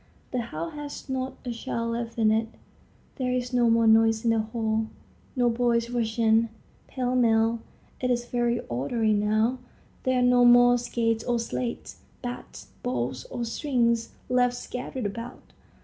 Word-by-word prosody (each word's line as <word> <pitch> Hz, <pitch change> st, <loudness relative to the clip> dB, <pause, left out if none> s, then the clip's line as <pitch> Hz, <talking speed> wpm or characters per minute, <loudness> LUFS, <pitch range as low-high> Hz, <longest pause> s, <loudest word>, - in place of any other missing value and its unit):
The 250 Hz, -, 0 dB
house 165 Hz, -7 st, -5 dB
has 295 Hz, -1 st, -7 dB
not 260 Hz, 0 st, -2 dB
a 245 Hz, -, -2 dB
child 230 Hz, 0 st, -3 dB
left 230 Hz, 0 st, -4 dB
in 220 Hz, -2 st, +4 dB
it; 220 Hz, +1 st, +1 dB, 0.7 s
there 255 Hz, -1 st, -1 dB
is 250 Hz, 0 st, -2 dB
no 240 Hz, -1 st, +4 dB
more 230 Hz, 0 st, +4 dB
noise 225 Hz, 0 st, +4 dB
in 230 Hz, -, +4 dB
the 225 Hz, -, +2 dB
hall; 220 Hz, 0 st, -1 dB, 0.5 s
no 245 Hz, -2 st, +3 dB
boys 235 Hz, 0 st, +1 dB
rush 230 Hz, -2 st, -1 dB
in, 225 Hz, 0 st, +3 dB, 0.4 s
pell 255 Hz, -1 st, -2 dB
mell; 230 Hz, -1 st, +3 dB, 0.4 s
it 250 Hz, -, -1 dB
is 240 Hz, -1 st, 0 dB
very 240 Hz, -1 st, 0 dB
orderly 215 Hz, -, 0 dB
now. 215 Hz, +4 st, +1 dB, 0.4 s
There 260 Hz, 0 st, +1 dB
are -, -, +2 dB
no 245 Hz, 0 st, +5 dB
more 245 Hz, 0 st, +7 dB
skates 230 Hz, -2 st, -1 dB
or 245 Hz, -1 st, 0 dB
sleds, 235 Hz, +1 st, -4 dB, 0.3 s
bats, 245 Hz, -, -7 dB
balls, 125 Hz, 0 st, -2 dB
or 240 Hz, -, -4 dB
strings 235 Hz, -2 st, 0 dB
left 245 Hz, 0 st, +2 dB
scattered 250 Hz, 0 st, -5 dB
about. 230 Hz, +4 st, -7 dB
235 Hz, 160 wpm, -26 LUFS, 225-245 Hz, 0.7 s, more